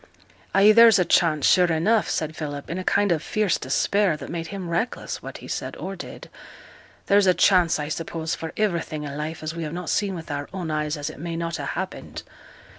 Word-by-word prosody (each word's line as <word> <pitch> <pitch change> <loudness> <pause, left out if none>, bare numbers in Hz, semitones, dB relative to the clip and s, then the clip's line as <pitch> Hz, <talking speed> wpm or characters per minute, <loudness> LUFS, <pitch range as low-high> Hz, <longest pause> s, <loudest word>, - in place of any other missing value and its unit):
'Ay, 200 +2 +7
there's 230 0 +8
a 180 - +2
chance, 155 -5 +3
sure 180 -2 +5
enough,' 210 +8 +2
said 155 0 -2
Philip, 145 -1 -5
in 175 - -3
a - - -4
kind 205 +1 +2
of 160 -3 +1
fierce 210 -6 0
despair 180 +6 +1
that - - -8
made 165 -1 -4
him 195 -2 -6
reckless 170 +9 -2
what - - -8
he - - -11
said - - -4
or - - -6
did. - - -9 0.8
'There's 200 0 +4
a 180 - +5
chance, 180 -4 +4
I 150 -1 -3
suppose, 160 +1 -3
for 165 - -4
iverything 170 -7 -1
i' 140 - -6
life 155 +2 -5
as 155 +1 -3
we 170 - -6
have 155 -1 -4
not 180 -1 -4
seen 200 -2 0
with 165 -3 -7
our 145 0 -4
own 180 -4 -4
eyes 150 0 -1
as 145 +1 -4
it - - -13
may 170 +1 -4
not 170 0 -3
ha' 145 - -5
happened. 190 +1 -6
170 Hz, 220 wpm, -24 LUFS, 155-190 Hz, 0.8 s, there's